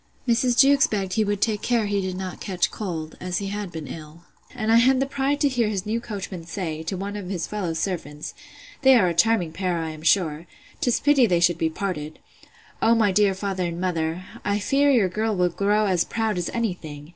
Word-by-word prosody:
Mrs. 240 +1 +2
Jewkes 275 0 +6
begged 195 -3 -2
he 220 - +2
would 205 -1 -2
take 215 -3 +1
care 235 -3 +1
he 200 -1 0
did 185 -1 -4
not 185 -1 -6
catch 180 -3 0
cold, 165 -7 -5
as 180 -1 -2
he 195 0 -3
had 205 -2 -4
been 160 -2 -6
ill. 155 +4 -10 0.3
And 220 -2 -1
I 230 - +7
had 260 +2 +4
the 270 - +2
pride 275 +1 -1
to 290 - +4
hear 245 -5 +1
his 195 -3 -3
new 225 +2 -1
coachman 195 -6 -6
say, 165 -4 -4
to 185 +4 -4
one 200 +2 -4
of 200 -3 -6
his 180 -4 -2
fellow 195 -6 -3
servants, 160 -4 -4 0.5
They 265 -2 +7
are 195 -7 +4
a - - -1
charming 185 -2 +2
pair, 180 +1 -2
I 160 -1 -3
am 155 -1 -10
sure! 165 -1 +1 0.3
'tis 250 -6 +1
pity 275 -4 +4
they 175 -4 +2
should 175 -1 +2
be 160 - +1
parted!—O 175 +6 -3
my 215 -3 +3
dear 195 0 +3
father 190 -2 -2
and 170 0 -5
mother! 170 -1 -2 0.2
I 205 +1 0
fear 275 +7 +2
your 235 -8 +4
girl 215 +3 -1
will 180 -1 +2
grow 205 +4 +1
as 180 -4 +2
proud 220 -4 -1
as 175 - -2
any 230 -5 0
thing! 150 -3 -10
195 Hz, 225 wpm, -24 LUFS, 170-225 Hz, 0.5 s, I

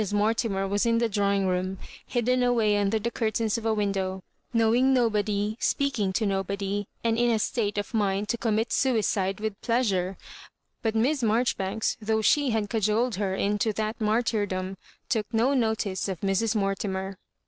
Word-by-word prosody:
Mortimer 205 -1 +1
was 205 +4 +1
in 230 0 +3
the 235 0 +2
drawing 200 -2 +1
room, 185 +1 -1 0.3
hidden 250 0 +1
away 230 -4 +3
under 205 +1 +1
the 230 +2 -2
curtains 220 -2 0
of 225 - -4
a 220 - +2
window, 190 -2 -1 0.3
knowing 240 +3 +3
nobody, 210 -3 +1
speaking 240 -9 0
to 215 - 0
nobody, 200 +1 -2 0.2
and 230 0 +1
in 240 0 +3
a 230 - +3
state 210 -1 -1
of 205 +3 -3
mind 205 -1 0
to - - +1
commit 225 0 0
suicide 210 -6 +1
with 215 -1 -4
pleasure; 195 -6 0 0.6
but 225 -1 -1
Miss 265 +6 +2
Maijoribanks, 220 -2 0
though 220 0 0
she 290 +4 +3
had 220 -3 0
cajoled 220 +1 +1
her 195 -2 -1
into 210 +3 0
that 220 +2 -3
martyrdom, 210 -4 0 0.3
took 220 -3 -1
no 235 +4 +2
notice 220 -7 0
of 185 -4 -4
Mrs. 200 +3 +1
Mortimer. 195 -1 -2
215 Hz, 160 wpm, -26 LUFS, 195-230 Hz, 0.6 s, in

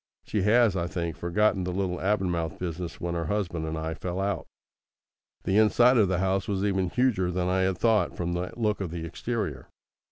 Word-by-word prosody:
She 105 - -1
has, 110 0 +4
I 85 -2 -1
think, 85 -3 -3
forgotten 95 +2 +1
the 90 - -2
little 90 -1 -2
Avonmouth 90 -5 0
business, 85 -1 -5
when 85 0 -3
her 85 -1 -2
husband 85 -4 -2
and 80 0 -3
I 80 +1 -3
fell 90 +3 -4
out. 100 +1 -2 1.0
The 95 +3 +3
inside 120 +4 +5
of 105 -4 +5
the 95 -1 0
house 95 +1 0
was 100 -1 -1
even 95 -3 +1
huger 110 -6 +1
than 90 0 -1
I 95 +1 +1
had 95 -1 +1
thought 110 -2 +2
from 85 0 -2
the 90 +1 -3
look 105 -3 0
of 95 - -2
the 85 0 -5
exterior. 85 - -4
95 Hz, 200 wpm, -27 LUFS, 85-105 Hz, 1.0 s, inside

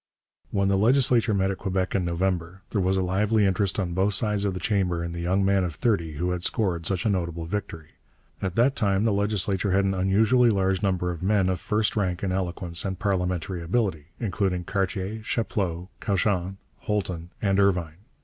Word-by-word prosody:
When 100 0 +1
the 95 0 +2
legislature 115 -2 +3
met 95 0 +1
at 95 - -6
Quebec 95 -1 -1
in 95 - +1
November, 90 +1 -2
there 105 - +1
was 95 +1 +1
a 95 - +1
lively 105 +4 +2
interest 95 +1 +1
on 90 -3 -2
both 95 +3 +2
sides 105 -1 0
of 95 -2 -1
the - - -3
chamber 90 -5 0
in 85 - -4
the 85 - -6
young 95 +3 +1
man 100 -1 +3
of 85 -4 -3
thirty 95 -10 0
who 90 +5 -1
had 90 -1 -2
scored 90 -5 0
such 95 0 0
a - - +3
notable 85 -3 -2
victory. 85 -4 -5 0.5
At 95 -2 -2
that 130 +4 +3
time 100 -4 +1
the 110 - +2
legislature 100 -2 +1
had 100 +1 +3
an 95 - +1
unusually 110 +6 +3
large 95 -2 +1
number 90 -3 0
of 85 - -7
men 95 -1 +2
of 90 -2 -1
first 105 +2 0
rank 95 -3 -1
in 95 - 0
eloquence 90 -2 -1
and 95 -2 -3
parliamentary 90 -2 -1
ability, 85 -4 -1
including 95 -5 -1
Cartier, 100 +3 -2
Chapleau, 95 -5 -2
Cauchon, 95 -2 0 0.2
Holton, 90 -5 -3
and 100 -2 +1
Irvine. 90 -5 +1
95 Hz, 195 wpm, -25 LUFS, 90-100 Hz, 0.5 s, legislature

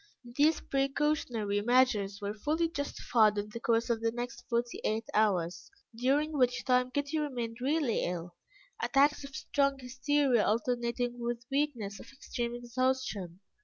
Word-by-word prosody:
These 305 +3 +3
precautionary 270 -7 0
measures 215 -4 +2
were 200 +1 -2
fully 310 +10 0
justified 240 -8 +1
in 205 +1 -2
the 230 - -7
course 230 -1 +1
of 225 -1 -1
the 230 0 +1
next 240 +1 -5
forty 235 0 -1
eight 220 +1 0
hours, 180 -5 +1 0.3
during 275 +6 +1
which 250 -3 +1
time 250 -1 +3
Kitty 285 +4 -1
remained 245 -5 -3
really 280 -3 +1
ill, 175 0 -4 0.5
attacks 285 +2 +3
of 275 -1 -9
strong 275 0 +1
hysteria 260 -1 +1
alternating 240 +1 0
with 235 0 -3
weakness 260 -9 -1
of - - -12
extreme 240 -3 -4
exhaustion. 240 -7 -2
245 Hz, 140 wpm, -31 LUFS, 220-275 Hz, 0.5 s, These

